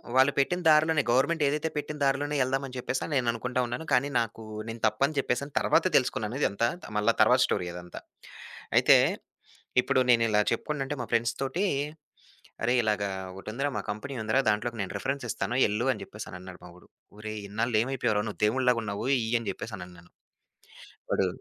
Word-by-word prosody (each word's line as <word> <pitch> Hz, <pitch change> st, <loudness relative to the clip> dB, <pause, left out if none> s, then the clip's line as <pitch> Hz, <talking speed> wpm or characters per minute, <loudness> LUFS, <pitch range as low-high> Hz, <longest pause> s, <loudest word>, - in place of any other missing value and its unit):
వాళ్లు 130 Hz, +2 st, +6 dB
పెట్టిన 175 Hz, +6 st, +1 dB
దారిలోనే 155 Hz, 0 st, +5 dB
గవర్నమెంట్ 140 Hz, +6 st, +2 dB
ఏదైతే 150 Hz, +3 st, 0 dB
పెట్టిన 150 Hz, +1 st, -4 dB
దారిలోనే 140 Hz, +2 st, +1 dB
ఎళ్దాం 135 Hz, +1 st, 0 dB
అని 130 Hz, -, -11 dB
చెప్పేసని 130 Hz, +4 st, -3 dB
నేననుకుంటూ 125 Hz, 0 st, 0 dB
ఉన్నాను. 120 Hz, +7 st, -5 dB
కానీ 125 Hz, +3 st, +3 dB
నాకూ 115 Hz, -1 st, -4 dB, 0.2 s
నేను 115 Hz, 0 st, -6 dB
తప్పని 140 Hz, +8 st, 0 dB
చెప్పేసని 140 Hz, +2 st, -1 dB
తర్వాత -, -, +3 dB
తెలుసుకున్నానిదంతా 110 Hz, 0 st, +1 dB, 0.2 s
త -, -, -9 dB
మళ్లీ 105 Hz, +2 st, +3 dB
తరువాత 125 Hz, +4 st, +5 dB
స్టోరీ 90 Hz, -, -1 dB
అదంతా. 90 Hz, 0 st, -8 dB, 0.8 s
అయితే -, -, +7 dB, 0.9 s
ఇప్పుడు 130 Hz, -, +2 dB
నేను 115 Hz, -1 st, +5 dB
ఇలా 105 Hz, -1 st, +3 dB
చెప్పుకుంటుంటే 135 Hz, +3 st, -2 dB
మా 120 Hz, -, -3 dB
ఫ్రెండ్స్‌ 115 Hz, 0 st, +2 dB
తోటి, 165 Hz, +9 st, -1 dB, 1.0 s
"అరేయ్ 120 Hz, +2 st, +2 dB
ఇలాగ 105 Hz, -1 st, +1 dB, 0.3 s
ఒకటుందిరా, 110 Hz, +9 st, -3 dB
మా -, -, -3 dB
కంపెనీ 120 Hz, +7 st, -5 dB
ఉందిరా. 110 Hz, +5 st, +2 dB
దాంట్లోకి 115 Hz, +3 st, -2 dB
నేను 95 Hz, -, -5 dB
రిఫరెన్సిస్తాను. 125 Hz, -4 st, -2 dB
ఎళ్లు" 105 Hz, +4 st, -1 dB
అని 105 Hz, -, -9 dB
చెప్పేసన్నాడు. 90 Hz, -3 st, -10 dB, 0.3 s
ఒరేయ్! 110 Hz, 0 st, -5 dB
ఇన్నాళ్లు 110 Hz, +2 st, 0 dB
ఏమైపోయావురా! 115 Hz, -5 st, 0 dB
నువ్వు 105 Hz, -, -8 dB
దేవుడిలాగున్నావు. 115 Hz, -3 st, 0 dB
ఇయ్యని 115 Hz, -1 st, 0 dB
చెప్పేసనన్నాను. 90 Hz, -5 st, -9 dB, 1.0 s
వాడు -, -, +2 dB
120 Hz, 145 wpm, -28 LUFS, 105-135 Hz, 1.0 s, అయితే